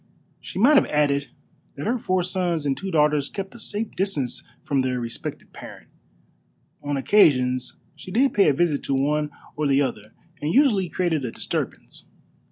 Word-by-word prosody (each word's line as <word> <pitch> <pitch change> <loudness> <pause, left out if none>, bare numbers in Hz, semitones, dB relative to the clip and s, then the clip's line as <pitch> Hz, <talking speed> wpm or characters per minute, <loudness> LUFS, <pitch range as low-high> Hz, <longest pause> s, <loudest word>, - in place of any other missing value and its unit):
She - - -9
might 270 +9 +6
have - - +4
added 140 -2 +1 0.5
that 145 - -6
her 240 +3 0
four 185 -3 0
sons 175 -4 -1
and 140 -1 +1
two 195 - -5
daughters 150 -4 +2
kept 195 -1 -5
at - - -11
a - - -14
safe 220 -1 -3
distance 170 -10 -2 0.2
from 140 - 0
their 130 -1 0
respected 115 -1 -7
parent. - - -11 0.9
On 145 -1 -2
occasions 130 -7 +3 0.2
she - - -11
did 260 +8 +2
pay 200 -6 +5
a - - +3
visit 150 -1 +1
to 135 - 0
one 150 +2 +1 0.3
or 150 -1 0
the 140 +1 +3
other, 110 -5 -5 0.3
and 150 +2 -1
usually 210 - +3
created 170 -6 0
a 125 - -2
disturbance. - - -5
150 Hz, 175 wpm, -24 LUFS, 140-190 Hz, 0.9 s, might